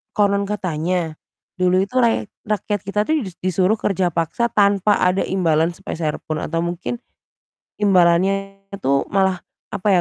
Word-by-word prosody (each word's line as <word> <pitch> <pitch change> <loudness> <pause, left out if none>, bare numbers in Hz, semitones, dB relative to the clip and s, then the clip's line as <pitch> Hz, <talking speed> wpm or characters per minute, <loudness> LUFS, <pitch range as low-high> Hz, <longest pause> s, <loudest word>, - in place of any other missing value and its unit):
konon 200 -1 +2
katanya 175 -4 -2 0.4
dulu 185 0 +2
itu 205 +6 -8
rayek 230 -3 +2 0.2
rakyat 210 -1 -1
kita 200 +1 -2
tuh 315 -2 +2
dis 185 -3 -8
disuruh 185 +4 +1
kerja 185 -3 0
paksa 170 +9 -1
tanpa 200 -1 +3
ada 180 +1 +2
imbalan 165 -3 +1
sepeser 165 -4 -4
pun 155 -1 -2
atau 165 - -2
mungkin 175 +7 -4 0.8
imbalannya 195 +1 +3 0.2
itu 140 -7 0
malah 190 -2 +2 0.3
apa 195 - -3
190 Hz, 140 wpm, -20 LUFS, 170-200 Hz, 0.8 s, tanpa